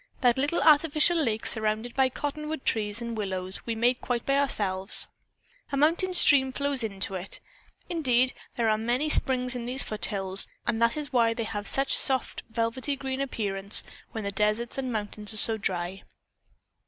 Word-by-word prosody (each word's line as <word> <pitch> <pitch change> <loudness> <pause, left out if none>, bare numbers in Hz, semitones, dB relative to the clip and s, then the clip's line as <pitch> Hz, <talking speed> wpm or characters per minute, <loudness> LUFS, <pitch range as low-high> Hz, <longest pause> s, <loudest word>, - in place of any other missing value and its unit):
"That 245 -1 +2
little 290 +5 0
artificial 305 +2 +4
lake 225 -6 -2
surrounded 220 +2 +2
by 265 -1 +2
cottonwood 300 +2 -5
trees 215 +1 -1
and 235 -1 -5
willows 190 -2 -3
we 230 - -2
made 240 +3 0
quite 240 -2 -3
by 275 - +1
ourselves. 195 -8 +2 0.6
A 275 - -2
mountain 340 +5 +1
stream 270 -6 +4
flows 280 -1 -1
into 195 -2 -2
it. 185 +1 -1 0.5
Indeed, 255 -7 +1 0.2
there 235 -2 0
are 215 0 +1
many 250 +7 -1
springs 250 -3 +2
in 240 -1 -5
these 260 +2 -1
foothills 195 -2 +1 0.2
and 230 -1 -1
that 230 +4 +2
is 295 -2 -6
why 230 -2 +2
they 230 - -3
have 205 -2 -5
such 270 0 0
a - - +4
soft, 260 -3 -1
velvety 230 +5 -1
green 265 0 -5
appearance 200 -6 +2 0.3
when 220 - -6
the 200 - -3
desert 210 +4 -1
and 260 -2 -3
mountains 210 -1 0
are - - +1
so 220 +1 +6
dry." 185 -1 -3
235 Hz, 175 wpm, -26 LUFS, 210-270 Hz, 0.6 s, so